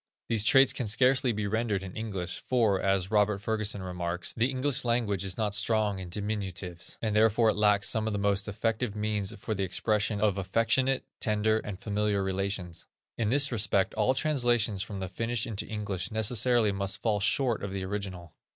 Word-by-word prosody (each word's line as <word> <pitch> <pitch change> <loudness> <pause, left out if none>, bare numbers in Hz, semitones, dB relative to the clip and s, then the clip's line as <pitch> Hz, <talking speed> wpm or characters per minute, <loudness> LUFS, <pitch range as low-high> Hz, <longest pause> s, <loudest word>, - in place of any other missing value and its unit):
These 110 -2 +2
traits 135 +3 +6
can 125 - -3
scarcely 125 +4 +3
be 105 -1 -3
rendered 105 -2 -1
in 95 -1 -8
English; 95 -6 -4
for, 110 -7 +2
as 95 0 0
Robert 105 -1 +2
Ferguson 105 -1 -1
remarks: 90 -1 -3
"The 120 +2 +1
English 135 +1 -1
language 115 -6 0
is 95 -2 -3
not 105 -2 -1
strong 105 -1 +1
in 90 -1 -7
diminutives, 95 -3 -4
and 110 -2 0
therefore 110 +1 +4
it - - -5
lacks 105 -1 +3
some 110 -1 +1
of 110 - -1
the - - -1
most 100 0 0
effective 110 +1 -2
means 105 -1 -1
for 110 - -4
the 100 - -3
expression 105 +3 0
of 100 -2 +1
affectionate, 115 +7 +1
tender, 110 0 +1
and 105 -3 -7
familiar 105 -1 0
relations." 95 -2 -3 0.3
In 110 -2 +1
this 140 +3 +3
respect 100 -4 +1
all 110 +5 +1
translations 120 -8 +2
from 100 0 -5
the 95 - -3
Finnish 115 +4 -2
into 110 -4 -5
English 100 -5 -3
necessarily 110 0 +3
must 100 0 -2
fall 105 -3 +1
short 115 +3 +1
of 100 - -5
the 95 -1 -4
original. 95 -4 -6
105 Hz, 185 wpm, -28 LUFS, 100-115 Hz, 0.3 s, traits